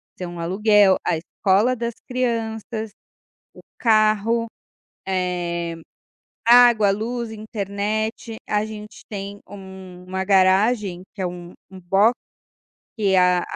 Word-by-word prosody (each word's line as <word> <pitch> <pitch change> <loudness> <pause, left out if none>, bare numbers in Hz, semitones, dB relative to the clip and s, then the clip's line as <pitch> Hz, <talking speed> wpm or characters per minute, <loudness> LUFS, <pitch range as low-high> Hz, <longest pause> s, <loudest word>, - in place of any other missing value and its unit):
que 185 - -8
são 175 -1 -7
aluguel, 200 +2 +4
a 160 - +1
escola 200 +8 +1
das 235 -1 -4
crianças, 225 -3 -3 0.6
o - - -15 0.2
carro, 220 +1 +2 0.6
eh, 175 -2 -2 0.7
água, 235 -4 +6
luz, 230 +3 -3
internet, 215 +1 -4
a 210 0 +1
gente 215 -1 -10
tem 200 -1 -6
uma 190 -1 -8
garagem 190 0 +2
que 195 - -6
é - - 0
um 175 0 -9 0.2
um 190 - -11
box, 195 +7 +3 0.8
que 200 -4 +1
a 180 -1 +4
205 Hz, 110 wpm, -22 LUFS, 185-220 Hz, 0.8 s, água